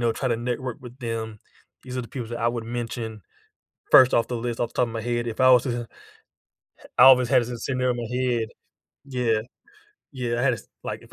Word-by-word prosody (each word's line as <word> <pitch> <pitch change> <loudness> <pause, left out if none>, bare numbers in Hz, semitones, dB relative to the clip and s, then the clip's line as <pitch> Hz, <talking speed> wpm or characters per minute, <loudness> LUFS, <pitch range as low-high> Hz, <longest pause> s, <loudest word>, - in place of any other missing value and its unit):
know, 120 -1 +2
try 130 +3 -2
to 115 - +1
network 120 +1 -3
with 125 +1 -12
them. 115 -3 -5 0.4
These 130 0 -6
are - - -2
the 120 - -10
people 120 -4 -6
that 120 - -4
I 115 - +2
would 120 -1 -3
mention 115 -2 -5 0.7
first 130 -1 +8
off 115 - +2
the 120 - -2
list, 120 0 -3
off 120 - 0
the - - -24
top 125 - +2
of 115 - -8
my 115 - -3
head, 120 0 -2
if 115 +2 -3
I 130 - +6
was 125 -1 +6
to 130 - -2
ha 120 - -2 1.1
ha - - -15
I - - +8
always 125 -2 +7
had 120 - +5
this 120 0 -6
scenario 130 -1 0
in - - -6
my 120 +1 -4
head. 120 -3 0 0.6
Yeah. 125 -5 0 0.7
Yeah, 120 -3 -2
I - - -1
had 130 -3 +3
this 110 - -11 0.2
Like, - - -5
if - - -18
120 Hz, 245 wpm, -24 LUFS, 115-125 Hz, 1.1 s, first